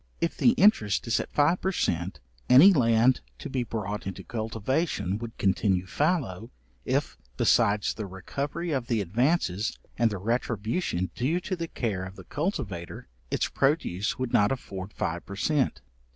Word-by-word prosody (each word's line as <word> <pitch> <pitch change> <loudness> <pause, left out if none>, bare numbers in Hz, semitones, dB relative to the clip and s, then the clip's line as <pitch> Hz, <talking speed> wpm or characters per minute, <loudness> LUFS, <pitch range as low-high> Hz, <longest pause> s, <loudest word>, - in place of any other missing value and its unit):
If 170 - -1
the 240 - +4
interest 190 - +3
is 115 - +1
at - - -5
five 150 +5 +2
per 190 - 0
cent. 85 - -1 0.3
any 150 +11 +9
land 120 -2 +4 0.2
to - - -7
be 130 - 0
brought 105 -3 -4
into 95 - -6
cultivation 115 - -2
would 115 -1 -7
continue 95 -1 +1
fallow, 115 - -1 0.4
if, - - -1 0.2
besides 100 0 +3
the 105 -3 -5
recovery 140 - -4
of 130 -5 -1
the 115 -4 +1
advances, 110 - 0 0.2
and 120 -1 +4
the 105 - -4
retribution 110 - -1
due 150 +8 0
to 185 +1 -3
the 170 -1 -4
care 105 - -2
of 95 +1 -8
the - - -11
cultivator, 110 - -4 0.2
its - - 0
produce 135 - 0
would 130 -2 -3
not 105 +3 +4
afford 100 -7 -5
five 85 -3 -3
per 100 - -8
cent. 135 - 0
115 Hz, 160 wpm, -27 LUFS, 95-145 Hz, 0.4 s, any